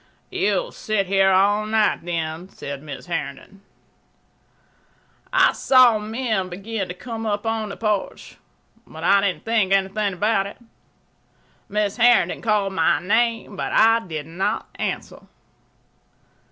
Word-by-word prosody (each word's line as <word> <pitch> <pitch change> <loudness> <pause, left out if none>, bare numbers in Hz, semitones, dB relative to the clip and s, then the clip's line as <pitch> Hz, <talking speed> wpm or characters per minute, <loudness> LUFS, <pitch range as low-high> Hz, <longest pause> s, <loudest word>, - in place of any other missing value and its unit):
"You'll - - 0
sit 215 -2 -1
here 195 0 +3
all 205 +3 +3
night, 215 -1 +2
then," 165 +1 -4
said 140 -5 -7
Mrs. 145 -3 -9
Herndon. 170 +2 -6 1.7
I - - +4
saw 250 -4 +5
men 215 -3 -2
begin 195 +2 -4
to 180 - -7
come 225 +2 -6
upon 215 +1 -2
the 195 - -7
porch, 210 -3 -3 0.5
but 160 +1 -10
I 200 +3 +4
didn't 195 -2 -2
think 220 -4 +1
anything 195 +1 +1
about 200 +1 +1
it. 200 - -11 1.1
Mrs. 210 +2 0
Herndon 245 0 +4
called 210 -3 0
my 165 -4 +2
name, 225 +2 0
but - - -4
I 225 +1 +5
did 160 -8 -6
not 170 +5 -2
answer. - - -4
200 Hz, 125 wpm, -22 LUFS, 185-220 Hz, 1.7 s, saw